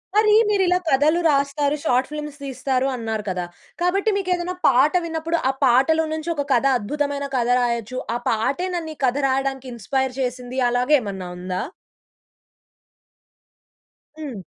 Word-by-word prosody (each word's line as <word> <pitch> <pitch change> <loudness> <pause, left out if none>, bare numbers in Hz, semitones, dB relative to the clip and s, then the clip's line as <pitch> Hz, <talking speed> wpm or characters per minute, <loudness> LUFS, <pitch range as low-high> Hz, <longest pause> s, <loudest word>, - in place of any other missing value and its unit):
మరి 425 0 +5 0.2
మీరు 405 -2 +2
ఇలా 360 0 +3
కథలు 300 +5 +3
రాస్తారు. 285 0 +1
షార్ట్ 255 -4 +1
ఫిల్మ్స్ 300 -1 -6
తీస్తారు 265 -1 -1
అన్నారు 225 -3 -3
కదా! 180 -1 -2 0.4
కాబట్టి 390 +4 +2
మీకు 385 -2 -3
ఏదైనా 360 +1 -3
పాట 270 +3 +4
విన్నప్పుడు 325 0 -2
ఆ - - +3
పాటలొ 270 +6 +4
నుంచి 315 +1 -4
ఒక 285 -2 -2
కథ 245 +1 +2
అద్భుతమైన 285 +4 -2
కథ 240 -1 0
రాయొచ్చు. 240 0 -1 0.2
ఆ - - +1
పాటే 265 +11 0
నన్ను 325 -2 -4
ఈ - - -35
కథ 255 +1 +1
రాయడానికి 270 0 -1
ఇన్స్పైర్ 265 +4 -1
చేసింది. 250 0 -3
అలాగ 245 +2 0
ఏమన్నా 195 -5 -6
ఉందా? 180 +1 -3 2.6
హ్మ్. 260 -11 -6
270 Hz, 145 wpm, -22 LUFS, 245-315 Hz, 2.6 s, మరి